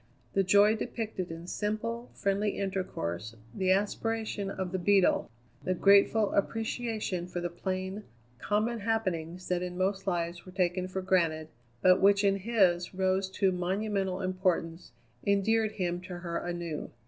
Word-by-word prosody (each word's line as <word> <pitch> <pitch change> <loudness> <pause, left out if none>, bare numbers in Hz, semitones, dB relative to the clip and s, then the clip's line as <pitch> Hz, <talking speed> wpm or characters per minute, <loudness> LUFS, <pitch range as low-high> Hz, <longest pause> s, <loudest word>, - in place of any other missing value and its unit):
The 195 - +3
joy 205 +3 +5
depicted 215 -5 -4
in 165 +1 -7
simple, 220 +5 -3
friendly 200 +1 0
intercourse, 115 - -3 0.2
the 190 -1 0
aspiration 210 +1 -1
of 190 -2 -4
the 190 - -1
Beetle, 195 +1 +3 0.3
the 185 - 0
grateful 200 +3 +4
appreciation 220 -3 -1
for 175 0 -4
the 175 0 -3
plain, 190 +3 -3 0.4
common 215 - 0
happenings 185 -5 -2
that 180 -1 +1
in 180 0 -4
most 190 +1 -1
lives 170 -1 -1
were 185 - -12
taken 185 -1 0
for 185 0 -4
granted, 165 -4 +1 0.3
but 185 0 +6
which 200 +1 +5
in 195 -1 +3
his 190 -4 +2
rose 190 0 +1
to 190 0 +1
monumental 190 +1 -1
importance, 185 -2 -1 0.3
endeared 215 +2 +2
him 175 -2 -2
to 180 -1 -7
her 170 -1 -3
anew. 175 -3 -4
190 Hz, 145 wpm, -30 LUFS, 180-205 Hz, 0.4 s, but